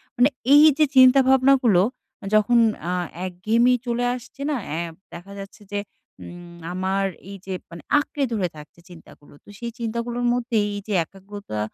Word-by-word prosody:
মানে 245 +3 +4 0.2
এইযে 300 +1 +6
চিন্তা 260 +1 +7
ভাবনাগুলো 260 -7 +4 0.5
যখন 215 +3 +4 0.3
আ - - -1 0.3
একঘেয়েমি 220 +7 +1
চলে 240 0 -1
আসছে 245 +2 -12
না? 295 - 0
অ্যা 160 +3 -3 0.3
দেখা 175 +4 -10
যাচ্ছে 195 +2 -11
যে 205 - -1 0.5
উম 175 0 -11 0.2
আমার 190 +1 -1 0.3
এইযে 195 -1 -8 0.2
মানে 170 0 -10 0.2
আঁকড়ে 290 -1 -3
ধরে 190 -5 0
থাকছে 150 +2 -14
চিন্তাগুলো। 160 -4 -16
তো - - -19
সেই 235 -1 -5
চিন্তাগুলোর 235 +1 -3
মধ্যেই 235 -3 0
এইযে 205 +1 -6
একাগ্রতা 195 - -9
215 Hz, 145 wpm, -23 LUFS, 185-245 Hz, 0.5 s, চিন্তা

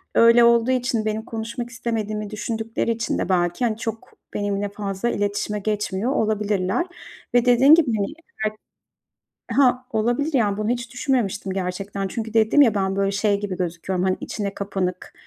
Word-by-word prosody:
Öyle 230 +1 +7
olduğu 235 +1 +4
için 245 -3 0
benim 220 +1 -2
konuşmak 235 +1 -5
istemediğimi 215 -3 -3
düşündükleri 225 +1 -2
için 230 +1 -1
de - - -2
belki, 175 +5 +1
hani, 220 -2 0
çok 225 -1 -6 0.2
benimle 205 0 -1
fazla 200 +2 -3
iletişime 205 0 -1
geçmiyor 210 +2 -1
olabilirler 210 - 0 0.5
ve, 245 0 +4
dediğin 255 +5 +7
gibi, 325 -5 +2
hani, 200 -1 0 0.4
belki 215 0 -2 1.0
Ha, 255 -2 +4
olabilir 240 +8 0
yani 210 -6 +2
bunu 215 +1 -1
hiç 240 0 -3
düşünmemiştim 215 -8 -1
gerçekten 195 +1 -3
çünkü 220 +2 -5
dedim 225 +6 +5
ya 230 -6 +5
ben 190 -1 0
böyle 195 0 +1
şey 205 0 +1
gibi 200 -3 -4
gözüküyorum, 180 +1 -2
hani, 185 - +1
içine 200 -2 -4
kapanık, 190 -3 -3
215 Hz, 155 wpm, -23 LUFS, 200-235 Hz, 1.0 s, Öyle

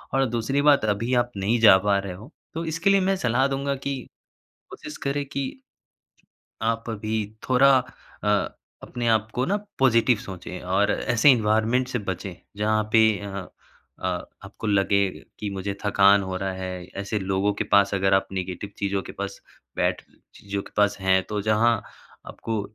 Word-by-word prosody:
और 135 0 +3
दूसरी 120 +5 0
बात 145 -6 +5
अभी 110 +4 0
आप 120 - -5
नहीं 110 +5 +1
जा 105 -4 +9
पा 100 -1 +3
रहे 100 -2 -5
हो, 110 - -12 0.2
तो 165 +1 -4
इसके 165 +4 0
लिए 195 0 +5
मैं 195 +1 +2
सलाह 130 -3 +2
दूँगा 140 0 -1
कि 140 +1 -3 0.7
कोशिश - - -9
करें 140 +1 -1
कि, 140 - -5 1.0
आप 115 +1 -1
अभी 110 0 -4 0.3
थोड़ा 135 +1 +6
अ, 125 -4 -8 0.5
अपने 120 -1 -3
आप 110 -1 +2
को 125 - +1
ना 200 - +1 0.2
पॉजिटिव 120 -2 +4
सोचें 90 -2 -8
और 95 +3 +1
ऐसे 120 +4 +3
एनवायरनमेंट 115 +1 +2
से 125 -1 -2
बचें 95 0 -4 0.2
जहाँ 110 0 +1
पे 115 - +6 0.2
अ 100 -2 -6 0.5
अ, - - -3 0.4
आपको - - -8
लगे 100 -1 +3 0.4
कि 105 -2 -4
मुझे 100 0 -4
थकान 100 0 +5
हो 95 -1 -4
रहा 95 0 -2
है। 95 -1 -5 0.2
ऐसे 100 +2 -2
लोगों 95 +1 0
के - - 0
पास 100 0 +3
अगर 95 0 +2
आप 95 - +2
नेगेटिव 95 +1 -4
चीज़ों 100 -1 -1
के - - -9
पास 100 0 -6 0.4
बैठ - - 0 0.3
चीज़ों 100 -1 -5
के - - -15
पास 105 0 +3
हैं, 95 0 +3
तो 105 -1 -3
जहाँ 110 +3 +3 0.5
आपको 110 -2 -4
105 Hz, 170 wpm, -24 LUFS, 100-125 Hz, 1.0 s, जा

